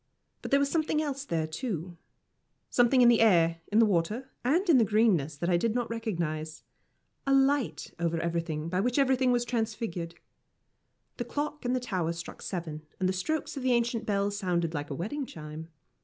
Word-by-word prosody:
But - - -6
there 280 - +4
was 280 0 +1
something 315 -2 +1
else 280 -2 -2
there, 165 - -1
too 175 - -4 0.8
something 245 +1 +4
in - - +7
the 235 -1 +5
air, 170 -6 +4
in 210 - +2
the 225 - +7
water, 210 +7 -1
and 330 +11 +2
in 310 -7 +6
the - - +5
greenness 195 -9 +2
that 170 - -2
I 175 -1 +3
did 225 +5 0
not 240 -2 -1
recognise 165 -9 -3 0.6
a 275 - +4
light 270 -2 +1
over 170 -1 0
everything 165 -2 -2
by 180 +2 -1
which 245 +6 0
everything 260 -2 +3
was 240 -1 +1
transfigured. 220 -8 -3 1.0
The 240 - -3
clock 295 +2 -4
in 245 - +1
the 255 - +1
tower 185 -9 -2
struck 170 0 -8
seven, 165 -5 -5 0.2
and 185 - +1
the 185 - +1
strokes 305 +11 -2
of 275 - -4
the 255 -1 +2
ancient 235 -1 0
bell 200 -1 +1
sounded 175 -5 -1
like 145 -2 -4
a 140 - -4
wedding 255 - -3
chime. 155 -1 -8
215 Hz, 190 wpm, -29 LUFS, 170-255 Hz, 1.0 s, in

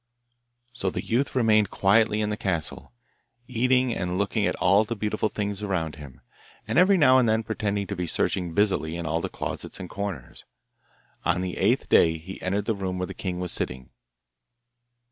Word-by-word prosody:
So 100 -6 -1
the - - -5
youth 130 +5 0
remained 110 -5 +3
quietly 110 +2 +3
in 105 0 -1
the - - -1
castle, 85 - -3 0.6
eating 125 0 +2
and 90 -2 -2
looking 100 +1 0
at - - -1
all 100 +4 +4
the 115 +2 -4
beautiful 110 +1 -1
things 105 -1 -3
around 85 -7 -2
him, 70 -4 -12 0.5
and - - +2
every 190 +2 +5
now 130 -5 +6
and 120 -3 +3
then 110 +1 +1
pretending 105 -2 -2
to 100 - -5
be 90 -1 -3
searching 85 0 0
busily 95 -6 +1
in 85 - -5
all 80 +1 -1
the - - -3
closets - - -6
and 90 - -6
corners. 100 -11 -6 0.8
On 90 - +1
the 90 -1 -3
eighth 115 +8 +2
day 80 -1 +4
he 90 +4 -10
entered 100 +2 -1
the 115 - +1
room 95 -2 -3
where 90 - -2
the - - -8
king 90 -2 -4
was 90 -1 -1
sitting. 65 -1 -2
100 Hz, 185 wpm, -25 LUFS, 90-110 Hz, 0.8 s, now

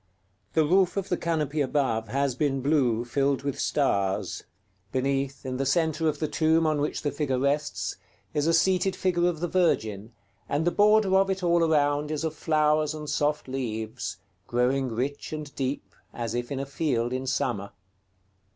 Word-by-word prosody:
The 160 -1 +3
roof 185 +3 +3
of 195 0 -2
the 180 - +2
canopy 155 -3 -1
above 130 -5 0
has 140 +3 0
been 135 0 -1
blue, 130 -6 +2
filled 140 +3 0
with 140 -2 -3
stars; 100 -9 0 0.5
beneath, 135 +1 -1
in 130 -1 -3
the 135 - 0
centre 160 +2 +1
of 150 - -3
the 155 - -1
tomb 160 +1 +2
on 155 -2 +1
which 150 - -2
the 145 - 0
figure 145 -3 -1
rests, 140 +3 -1 0.4
is 150 +1 +1
a - - +4
seated 185 +2 +2
figure 175 -2 +1
of 165 -3 -2
the 175 - 0
Virgin, 110 - 0 0.4
and 145 +3 0
the 175 - +3
border 210 -1 +4
of 195 0 +3
it 190 -1 -2
all 170 -1 +3
around 145 -2 +2
is 155 0 -2
of 160 -1 -1
flowers 155 0 +1
and 150 -1 -5
soft 150 0 0
leaves, 110 -5 -4 0.3
growing 130 +2 +1
rich 130 +5 -3
and 150 -2 -6
deep, 135 +1 -3 0.2
as 115 -2 -3
if 120 +1 -3
in 135 - -2
a 135 - -2
field 130 -4 -1
in 130 +1 -3
summer. 100 -5 -1
145 Hz, 180 wpm, -27 LUFS, 130-160 Hz, 0.5 s, a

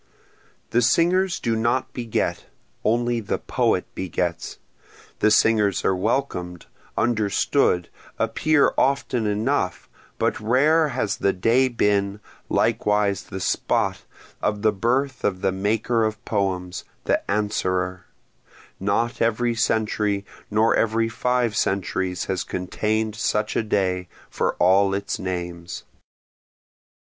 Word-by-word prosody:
The 120 - +3
singers 175 +9 +2
do 115 -1 0
not 115 +3 0
beget, 120 -3 -2 0.4
only 120 +1 +1
the 105 - -2
Poet - - 0
begets, 85 -1 -3 0.6
The 110 - +4
singers 105 -2 +3
are 95 - +3
welcom'd, 90 -5 -2 0.3
understood, 110 -4 +1 0.3
appear 140 +7 +2
often 130 -4 +1
enough, 105 0 -1 0.3
but - - 0
rare 145 +8 +3
has 100 -8 -2
the 100 - +1
day 115 +8 +3
been, 100 -4 0 0.3
likewise 105 -2 +1
the 95 - -6
spot, - - 0 0.4
of 105 0 -1
the 110 - +4
birth 125 +5 0
of 95 -2 0
the 95 - +2
maker 110 +4 0
of 110 +1 -3
poems, 95 -4 -2 0.2
the - - +1
Answerer, 95 -3 -1 0.7
(Not 105 +5 0
every 115 +1 +1
century 105 -3 0 0.2
nor 110 +2 +3
every 115 0 +1
five 120 0 0
centuries 95 -2 -1
has 95 -2 -2
contain'd 110 +4 -2
such 105 -2 -1
a - - +2
day, 95 -4 0 0.2
for - - -1
all 95 +2 +4
its 100 0 -3
names.) 85 -2 -5
105 Hz, 115 wpm, -23 LUFS, 95-115 Hz, 0.7 s, The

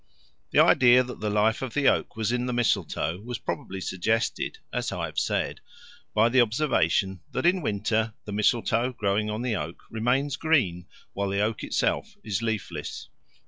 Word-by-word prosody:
The - - -2
idea 125 0 +6
that 125 0 -8
the 105 - -1
life 105 +2 +2
of 130 -4 -5
the 145 -2 +3
oak - - +2
was 110 0 -1
in 125 0 -1
the 125 - -1
mistletoe 95 -8 0
was 120 +3 -5
probably 95 +1 -5
suggested, 110 +5 -1 0.2
as - - -1
I - - -2
have - - -3
said, - - -1 0.5
by 110 +2 +5
the 125 +2 +4
observation 100 - +1
that - - -1
in 180 +1 +4
winter 110 -1 0
the 105 - -6
mistletoe 115 +3 +1
growing 105 -1 0
on 105 +3 -3
the 120 -3 0
oak 85 -2 -5
remains 130 +5 0
green 120 - +1 0.3
while 100 0 -2
the 100 +1 0
oak 110 +1 -1
itself - - -1
is 105 -1 -2
leafless. 110 -3 -4
110 Hz, 175 wpm, -26 LUFS, 100-125 Hz, 0.5 s, idea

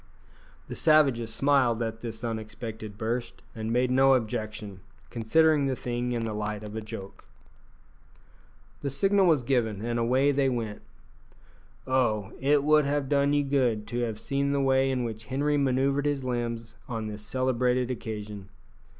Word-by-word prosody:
The - - -6
savages 135 -8 +3
smiled 125 -1 +3
at 115 0 -5
this 115 -1 -6
unexpected 110 -2 -6
burst, 115 +2 -3
and 110 0 -4
made 125 +1 +2
no 135 +1 +5
objection, 110 -4 -4 0.3
considering 145 +5 +3
the 130 - 0
thing 120 0 -3
in 115 -2 -1
the 110 - -3
light 105 0 -3
of 105 0 -8
a 110 - -3
joke. 100 -2 -9 1.5
The 140 - -3
signal 195 +7 +3
was 155 -7 +3
given, 115 -5 0
and 120 0 -1
away 130 +4 +3
they 140 -1 +2
went. 115 -4 -3 1.0
Oh! 120 -6 0
it 140 +1 +3
would 150 0 +4
have 140 -1 -1
done 140 0 +3
you 145 0 +3
good 125 -6 +1
to 120 - -2
have 115 -3 -2
seen 140 +4 -1
the 140 - +1
way 135 0 +3
in 130 -2 0
which 110 -1 -5
Henri 145 +3 0
manoeuvred 140 +1 +1
his 145 -2 -1
limbs 120 -2 -3 0.2
on 115 -2 -3
this 105 -1 -6
celebrated 125 +2 0
occasion! 105 -4 -6
125 Hz, 160 wpm, -27 LUFS, 110-140 Hz, 1.5 s, no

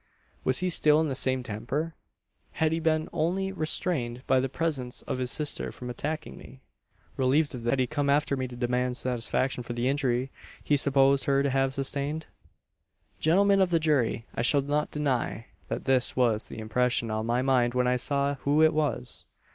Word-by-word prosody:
"Was 130 - +1
he 185 0 0
still 150 -2 +5
in 160 -1 +1
the - - -1
same 130 -1 +2
temper? 125 +9 -3 0.6
Had 160 -1 +1
he 165 - 0
been 155 -1 +1
only 180 +4 0
restrained 155 -8 -2
by 130 - +3
the 130 +1 -1
presence 140 -5 -3
of 130 - -4
his 125 -1 -1
sister 150 +1 0
from 125 -1 -7
attacking 155 +6 -5
me? 130 +2 -13 0.6
Relieved 140 +4 +2
of 125 - -6
this, 120 - -2
had 135 - +2
he 130 - +2
come 145 +1 -1
after 140 0 +2
me 130 -1 -3
to 125 - -10
demand 125 +1 -1
satisfaction 125 +1 0
for 120 0 -6
the 120 +1 -1
injury 130 -2 0 0.3
he 145 - +2
supposed 140 0 +3
her 140 -1 +2
to 140 - 0
have 135 0 +1
sustained? 140 +3 -2 0.9
"Gentlemen 195 +5 +4
of 185 - +3
the 170 -1 +2
jury! 140 -7 +1
I - - -2
shall 140 +4 +3
not 145 +2 -1
deny, 130 -6 -2 0.2
that - - -4
this 130 -2 +2
was 120 -4 +1
the - - -9
impression 115 +1 0
on 110 +1 -2
my 120 +2 +1
mind 125 -2 +2
when 125 0 +2
I 125 0 +2
saw 140 +2 0
who 145 +3 +3
it 160 0 +5
was. 150 -5 -2
135 Hz, 195 wpm, -27 LUFS, 125-150 Hz, 0.9 s, still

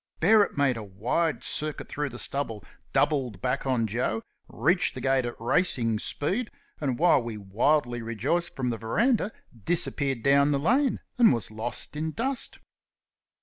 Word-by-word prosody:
Bearup 210 -5 +4
made 135 -4 +2
a 110 - -5
wide 120 - -1
circuit 155 0 -2
through 145 0 -3
the 120 - -9
stubble, 115 -7 -4 0.3
doubled 130 -10 +1
back 125 +5 -1
on 125 -4 +1
Joe, 110 0 -1 0.2
reached - - +1
the - - -6
gate 135 -2 +2
at 120 - -7
racing 115 -4 +1
speed, 195 - -2 0.3
and 135 -5 -1
while 170 -4 +4
we 115 -2 -5
wildly 120 +5 +1
rejoiced 125 +10 -2
from 125 -2 -1
the 115 - -4
verandah, 210 - +1 0.3
disappeared 140 - 0
down 140 +1 +5
the 145 - +2
lane 255 - +2 0.2
and 235 - +7
was 115 -4 -1
lost 115 +6 -3
in 155 +1 -3
dust. 265 +3 -2
135 Hz, 155 wpm, -27 LUFS, 115-160 Hz, 0.3 s, and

